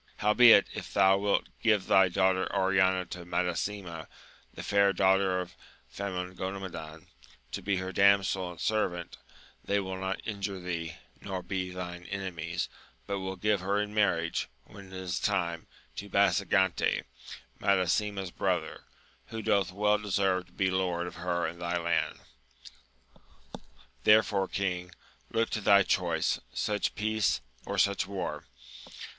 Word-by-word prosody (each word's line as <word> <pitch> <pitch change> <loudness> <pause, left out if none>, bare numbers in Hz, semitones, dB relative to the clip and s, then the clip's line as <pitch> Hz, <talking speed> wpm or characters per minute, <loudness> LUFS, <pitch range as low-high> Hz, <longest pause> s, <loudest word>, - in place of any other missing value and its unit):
Howbeit, 115 +3 +7
if - - -7
thou 95 0 +4
wilt 100 0 +1 0.2
give 105 -4 +3
thy 95 -1 +5
daughter 95 0 +1
Oriana 95 -1 +3
to 90 0 -8
Madasima, 90 -1 -3 0.4
the - - -8
fair 100 -1 +3
daughter 95 0 +3
of 90 0 -6 0.4
Famongomadan, 90 -4 -5 0.5
to - - -4
be 100 -1 0
her 95 0 -3
damsel 95 -2 +3
and 85 -2 -10
servant, 100 -5 -1 0.5
they 100 - 0
wiU 95 -1 -3
not 95 +1 -2
injure 100 -2 -4
thee, 85 -3 -4 0.3
nor 95 -2 -5
be 90 0 -3
thine 90 -1 -7
enemies, 85 -4 -4 0.4
but 100 - -2
wiU 95 0 -5
give 105 +1 +2
her 100 +2 0
in 105 0 -3
marriage, 85 -10 +1 0.2
when 100 -1 -13
it 95 - -14
is 95 -1 -3
time, 85 -5 -1 0.3
to 100 - -6
Basagante, 100 -2 +2 0.6
Madasima's 100 0 +1
brother, - - -2 0.4
who 110 -1 -6
doth 100 -3 +2
well 105 +2 +2
deserve 95 -3 0
to - - -24
be 95 0 +1
lord 90 -2 0
of 90 - -8
her 85 0 -1
and 85 +2 -5
thy 85 0 -1
land. 80 -3 0 1.9
Therefore, 105 -2 +4
king, 90 -2 -3 0.3
look 115 0 0
to 110 - -2
thy 100 0 +6
choice! 85 -4 0 0.2
such 105 -1 -1
peace, 110 -1 +1 0.3
or - - -3
such 100 -2 +2
war 90 -6 -4
95 Hz, 140 wpm, -29 LUFS, 90-100 Hz, 1.9 s, Howbeit